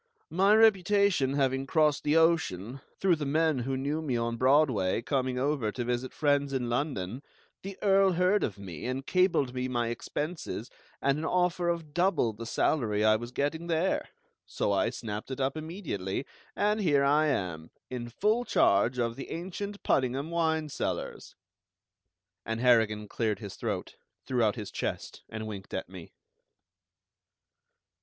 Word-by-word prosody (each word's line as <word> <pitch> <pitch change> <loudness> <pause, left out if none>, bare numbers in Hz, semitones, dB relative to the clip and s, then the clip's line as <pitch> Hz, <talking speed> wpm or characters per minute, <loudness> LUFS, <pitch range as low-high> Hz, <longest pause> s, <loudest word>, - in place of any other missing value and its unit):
"My 195 +5 +4
reputation 200 -9 +4
having 135 -1 0
crossed 150 -1 +2
the 150 +2 +3
ocean, 135 - +1 0.2
through 185 -3 +3
the 150 - -4
men 155 -1 +2
who 130 +2 -2
knew 145 +4 -2
me 135 -6 -1
on 115 0 -1
Broadway 130 -6 +3
coming 130 -1 -1
over 135 -4 0
to 120 - -3
visit 125 +2 -2
friends 145 -2 +1
in 125 -3 -1
London, 120 -4 -2 0.4
the 195 0 -7
Earl 195 -1 +4
heard 180 +4 +2
of 105 - -2
me, 95 -1 -7
and 130 +1 -3
cabled 180 -8 +2
me 130 0 -2
my 120 -2 -1
expenses 145 0 -4 0.3
and 140 +2 +2
an 160 - -3
offer 180 0 +1
of 165 -3 -3
double 175 - +2
the 115 +2 -8
salary 110 -5 +1
I 110 0 +6
was 120 +2 -4
getting 145 +6 -2
there; 170 +2 0 0.4
so - - -1
I - - +2
snapped 105 +1 -6
it 130 - -5
up 135 +2 0
immediately, 155 - -4 0.3
and 210 +1 +1
here 145 -7 +3
I 150 +3 +4
am, 90 - -2 0.2
in 120 -2 -4
full 215 - +1
charge 115 - +3
of 115 -1 0
the 135 - -8
ancient 200 +4 -5
Puddingham 135 +4 0
wine 160 -2 0
cellars." - - -4 1.1
And 115 +1 -3
Harrigan 110 -4 +3
cleared 110 0 -1
his 100 -4 -8
throat, - - -4 0.3
threw 125 -2 0
out 110 -2 +2
his 105 -4 -6
chest, - - -4
and 110 0 -5
winked 100 -3 -7
at 95 - -4
me. 90 -3 -11
135 Hz, 160 wpm, -29 LUFS, 115-165 Hz, 1.1 s, I